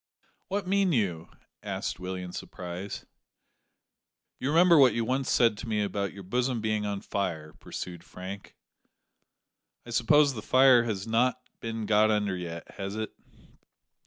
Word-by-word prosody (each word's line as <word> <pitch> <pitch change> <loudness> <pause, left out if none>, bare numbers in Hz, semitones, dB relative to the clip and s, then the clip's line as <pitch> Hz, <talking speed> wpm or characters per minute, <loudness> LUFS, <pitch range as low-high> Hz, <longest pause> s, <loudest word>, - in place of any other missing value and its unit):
"What 200 +1 -2
mean 195 0 +2
you?" 90 - -1 0.3
asked - - -4
Willie 90 0 -4
in 90 - -7
surprise. 90 +2 -7 1.3
"You 135 - -1
remember 170 +1 +6
what 130 -3 +6
you 115 -1 0
once 130 +2 -1
said 115 -4 +3
to 125 - -7
me 105 -2 0
about 100 -1 -2
your 100 - -10
bosom 125 +5 0
being 110 -1 -1
on 100 -1 -3
fire," 80 -6 -3
pursued 85 -2 -7
Frank. 95 +2 -9 1.3
"I 120 - -9
suppose 140 +5 +4
the 110 - -6
fire 130 0 +5
has 100 -4 -3
not 120 +3 +2 0.2
been 115 -1 -4
got 105 0 +4
under 105 -3 +1
yet, 85 -2 -7
has 100 +1 -4
it?" 110 0 -4
110 Hz, 150 wpm, -28 LUFS, 95-125 Hz, 1.3 s, remember